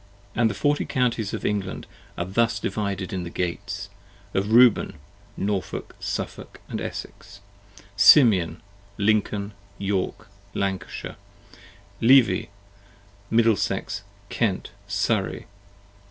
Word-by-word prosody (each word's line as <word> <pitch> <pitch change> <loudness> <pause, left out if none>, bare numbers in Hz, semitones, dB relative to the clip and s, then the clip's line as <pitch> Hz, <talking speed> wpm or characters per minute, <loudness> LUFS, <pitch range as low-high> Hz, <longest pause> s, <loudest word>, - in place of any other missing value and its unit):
And 115 -1 +3
the 100 - -4
Forty 145 +7 +1
Counties 120 -5 0
of - - -4
England 100 -3 -2 0.3
are 85 - -1
thus 115 +5 +1
divided 100 -3 -3
in 95 -2 -2
the 85 - -5
Gates: 100 +4 -3 0.5
Of 100 +3 0
Reuben, 120 0 +5 0.4
Norfolk, 100 -1 -3
Suffolk, - - -5 0.2
Essex. 100 - -7 0.6
Simeon, 100 - +6 0.3
Lincoln, 105 0 +1 0.2
York, 100 +1 -2 0.3
Lancashire. 95 -1 -3 0.8
45 - - -25
Levi, 125 +1 +5 0.8
Middlesex, 115 -4 +1 0.3
Kent, 105 -6 -1 0.2
Surrey. 100 0 -1
100 Hz, 95 wpm, -24 LUFS, 95-115 Hz, 0.8 s, Simeon